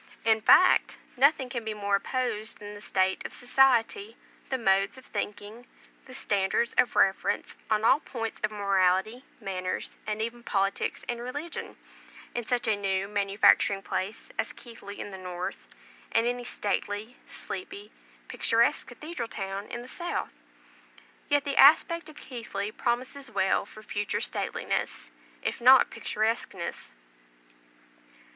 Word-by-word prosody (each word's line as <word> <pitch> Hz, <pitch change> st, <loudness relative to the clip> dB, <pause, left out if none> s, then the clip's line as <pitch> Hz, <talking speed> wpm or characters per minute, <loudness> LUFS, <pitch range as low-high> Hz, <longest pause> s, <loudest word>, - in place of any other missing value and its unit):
In 220 Hz, -1 st, +4 dB
fact, 365 Hz, -, +6 dB, 0.2 s
nothing 275 Hz, 0 st, +4 dB
can 240 Hz, -2 st, -4 dB
be 220 Hz, -1 st, -4 dB
more 200 Hz, -1 st, +1 dB
opposed 230 Hz, -2 st, -2 dB
than 205 Hz, 0 st, -9 dB
the 205 Hz, -, -10 dB
state 190 Hz, -2 st, +1 dB
of -, -, -6 dB
society, 270 Hz, -, +2 dB, 0.3 s
the 260 Hz, -, 0 dB
modes 195 Hz, 0 st, +2 dB
of 260 Hz, -, -13 dB
thinking, 210 Hz, +3 st, -5 dB, 0.4 s
the 255 Hz, -, -12 dB
standards 205 Hz, -1 st, 0 dB
of 245 Hz, -, +3 dB
reference 195 Hz, 0 st, +2 dB
on 215 Hz, 0 st, +2 dB
all 265 Hz, -, +6 dB
points 225 Hz, -6 st, -5 dB
of 210 Hz, -, +2 dB
morality, 200 Hz, +3 st, +1 dB, 0.2 s
manners, 185 Hz, -1 st, -4 dB
and 210 Hz, 0 st, -2 dB
even 235 Hz, +2 st, -3 dB
politics 195 Hz, -4 st, -1 dB
and 240 Hz, -1 st, -3 dB
religion, 290 Hz, +7 st, -6 dB, 0.6 s
in 240 Hz, -2 st, -4 dB
such 245 Hz, -2 st, 0 dB
a 220 Hz, -, +3 dB
new 195 Hz, -1 st, -1 dB
manufacturing 200 Hz, -1 st, +3 dB
place 195 Hz, +3 st, -4 dB
as -, -, -1 dB
Keighley 215 Hz, -4 st, -11 dB
in 205 Hz, -, -6 dB
the 190 Hz, -, -8 dB
north, 180 Hz, -1 st, -5 dB, 0.4 s
and 225 Hz, 0 st, +3 dB
any 245 Hz, 0 st, -1 dB
stately, 205 Hz, +2 st, -2 dB
sleepy, 395 Hz, +2 st, -7 dB, 0.4 s
picturesque 230 Hz, +1 st, +2 dB
cathedral 255 Hz, 0 st, -6 dB
town 195 Hz, 0 st, -5 dB
in 240 Hz, 0 st, -6 dB
the -, -, -11 dB
south. 345 Hz, +6 st, -4 dB, 1.0 s
Yet 290 Hz, -1 st, +3 dB
the 280 Hz, -, -2 dB
aspect 325 Hz, +4 st, +6 dB
of 310 Hz, -, -13 dB
Keighley 215 Hz, -6 st, -5 dB
promises 255 Hz, +4 st, -2 dB
well 190 Hz, 0 st, +1 dB
for 215 Hz, -, -13 dB
future 205 Hz, -1 st, -2 dB
stateliness, -, -, -3 dB, 0.3 s
if -, -, -2 dB
not 255 Hz, +1 st, +7 dB
picturesqueness. 215 Hz, -4 st, -2 dB
220 Hz, 140 wpm, -28 LUFS, 200-250 Hz, 1.0 s, not